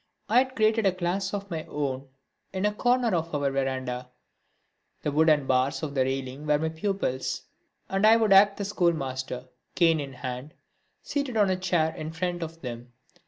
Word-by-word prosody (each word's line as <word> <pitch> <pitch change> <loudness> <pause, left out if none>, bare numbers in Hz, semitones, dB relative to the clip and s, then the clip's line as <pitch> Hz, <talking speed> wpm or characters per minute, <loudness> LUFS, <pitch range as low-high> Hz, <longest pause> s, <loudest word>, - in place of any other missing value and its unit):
I 225 +4 +5
had 260 0 0
started 220 -2 +3
a - - +4
class 185 +2 -1
of 200 -1 -5
my 160 -2 -3
own 135 -2 -3 0.4
in 190 +1 -1
a 210 - +2
corner 245 0 +2
of 165 -2 -1
our 140 -1 +1
verandah. 130 -2 -2 0.9
The 150 - 0
wooden 155 -1 +4
bars 130 +3 +1
of 145 -2 -3
the 135 -2 +2
railing 135 +2 -4
were 150 0 +4
my 160 +2 -1
pupils, 160 -6 -2 0.4
and 195 +1 -1
I 225 +1 +7
would 220 -3 +4
act 200 +1 +6
the 200 - -3
schoolmaster, 135 -9 -1 0.3
cane 165 -3 +4
in 140 -2 -5
hand, 125 +3 -6 0.5
seated 280 -5 -2
on 205 -3 +4
a - - +2
chair 175 -4 +1
in 155 +1 -6
front 175 +1 -2
of 165 0 -6
them. 120 -1 -7
160 Hz, 180 wpm, -27 LUFS, 135-195 Hz, 0.9 s, I